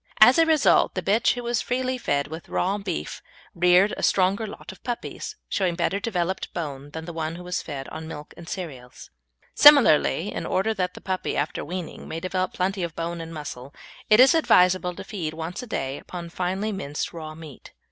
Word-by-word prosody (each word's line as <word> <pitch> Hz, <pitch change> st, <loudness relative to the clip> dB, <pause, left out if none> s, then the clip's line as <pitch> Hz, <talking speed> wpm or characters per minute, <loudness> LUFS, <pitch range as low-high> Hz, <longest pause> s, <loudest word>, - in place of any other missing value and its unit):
As 245 Hz, +7 st, +8 dB
a 325 Hz, -, +5 dB
result 315 Hz, -3 st, +4 dB
the -, -, -2 dB
bitch 215 Hz, +4 st, +3 dB
who 245 Hz, -, -5 dB
was 235 Hz, -1 st, 0 dB
freely 255 Hz, +1 st, -1 dB
fed 140 Hz, -9 st, 0 dB
with 160 Hz, +3 st, -9 dB
raw 195 Hz, +3 st, 0 dB
beef 190 Hz, -5 st, -4 dB, 0.3 s
reared 180 Hz, +3 st, +4 dB
a -, -, -5 dB
stronger 195 Hz, +3 st, +2 dB
lot 200 Hz, -, -9 dB
of 190 Hz, -, -17 dB
puppies, 240 Hz, -1 st, -5 dB
showing 185 Hz, -3 st, 0 dB
better 190 Hz, +3 st, 0 dB
developed 190 Hz, -4 st, -2 dB
bone, 145 Hz, -4 st, -5 dB
than 160 Hz, +2 st, -7 dB
did -, -, -9 dB
the 170 Hz, -, -7 dB
one 160 Hz, 0 st, -3 dB
who 180 Hz, -, -9 dB
was 180 Hz, 0 st, -2 dB
fed 135 Hz, -2 st, -6 dB
on 160 Hz, 0 st, -7 dB
milk 150 Hz, -2 st, -9 dB
and 170 Hz, -1 st, -11 dB
cereals. 135 Hz, -10 st, -8 dB, 0.4 s
Similarly, 240 Hz, -, +6 dB
in -, -, -4 dB
order 215 Hz, +4 st, +1 dB
that 180 Hz, -3 st, -2 dB
the -, -, -10 dB
puppy, 185 Hz, -1 st, -2 dB
after 145 Hz, +2 st, -2 dB
weaning, 175 Hz, +1 st, -6 dB
may 160 Hz, -, -4 dB
develop 185 Hz, +1 st, -2 dB
plenty 190 Hz, +1 st, -1 dB
of 170 Hz, -2 st, -4 dB
bone 170 Hz, 0 st, -4 dB
and 165 Hz, 0 st, -8 dB
muscle, 145 Hz, -4 st, -8 dB, 0.3 s
it 215 Hz, +1 st, +6 dB
is 260 Hz, +1 st, +8 dB
advisable 180 Hz, -, +3 dB
to -, -, -7 dB
feed 180 Hz, -6 st, -5 dB
once 165 Hz, +7 st, -5 dB
a 250 Hz, -, -9 dB
day 135 Hz, -9 st, -3 dB
upon 175 Hz, -2 st, -8 dB
finely 185 Hz, +5 st, -2 dB
minced 150 Hz, -7 st, -4 dB
raw 155 Hz, -2 st, -7 dB
meat. 155 Hz, -5 st, -12 dB
180 Hz, 205 wpm, -25 LUFS, 160-200 Hz, 0.4 s, As